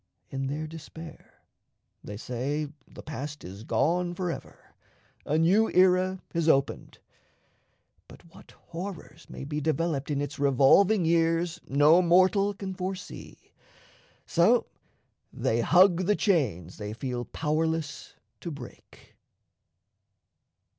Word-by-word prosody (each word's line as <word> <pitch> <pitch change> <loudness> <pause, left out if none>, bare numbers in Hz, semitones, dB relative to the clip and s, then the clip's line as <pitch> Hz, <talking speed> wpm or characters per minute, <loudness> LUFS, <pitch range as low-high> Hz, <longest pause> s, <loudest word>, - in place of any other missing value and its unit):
In 135 0 -3
their 150 +3 -3
despair, 160 +1 -12 0.6
they 105 - -7
say 135 +7 -3 0.2
the - - -12
past 150 0 -7
is 95 +4 -9
gone 175 +7 0
for 180 -1 -2
ever - - -11 0.5
a 150 - +1
new 190 +8 +3
era 185 0 +3
has 165 -1 +1
opened; 135 -3 0 1.1
but - - -15
what - - -16 0.2
horrors 170 -2 -8
may - - -8
be 150 +2 -4
developed 155 -1 -1
in 145 -2 -1
its 145 0 -4
revolving 145 - +4
years 165 +1 +1
no 150 +5 +5
mortal 185 +3 +3
can 195 -1 -5
foresee, 185 0 -7 0.7
so - - +3 0.7
they 115 +1 0
hug 180 - +4
the 210 - +3
chains 110 - 0
they 105 0 -5
feel 125 +1 -4
powerless 160 +1 -2 0.2
to 170 - -6
break. 140 -6 -12
160 Hz, 115 wpm, -27 LUFS, 140-180 Hz, 1.1 s, no